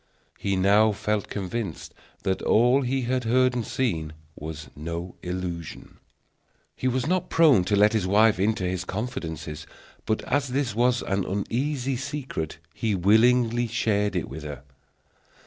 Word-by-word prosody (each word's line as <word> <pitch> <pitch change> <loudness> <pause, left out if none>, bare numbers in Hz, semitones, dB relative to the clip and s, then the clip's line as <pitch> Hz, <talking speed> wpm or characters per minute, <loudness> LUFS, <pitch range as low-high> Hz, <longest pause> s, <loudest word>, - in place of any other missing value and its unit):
He 100 -1 0
now 100 +3 +4
felt 105 0 -1
convinced 100 -2 -4 0.3
that 95 -2 0
all 125 +5 +4
he 130 0 -1
had 125 +1 0
heard 130 +2 +3
and 120 -1 -1
seen 85 -13 -2 0.2
was 75 0 -7
no 85 +4 -5
illusion. 90 -2 -6 0.8
He 130 - -2
was 130 0 0
not 180 +2 0
prone 150 - +5
to 100 - +1
let 105 +2 +5
his 105 -5 0
wife 105 0 +4
into 110 +1 +1
his 90 0 -1
confidence; 80 -8 -5 0.4
but 110 - 0
as 145 0 0
this 130 -1 -1
was 120 +2 +2
an 95 0 0
uneasy 130 +7 -1
secret, 130 - -4 0.2
he 110 -3 -1
willingly 115 +5 +4
shared 105 -3 0
it 90 - -1
with 80 - -8
her. 75 -3 -7
105 Hz, 145 wpm, -25 LUFS, 90-125 Hz, 0.8 s, prone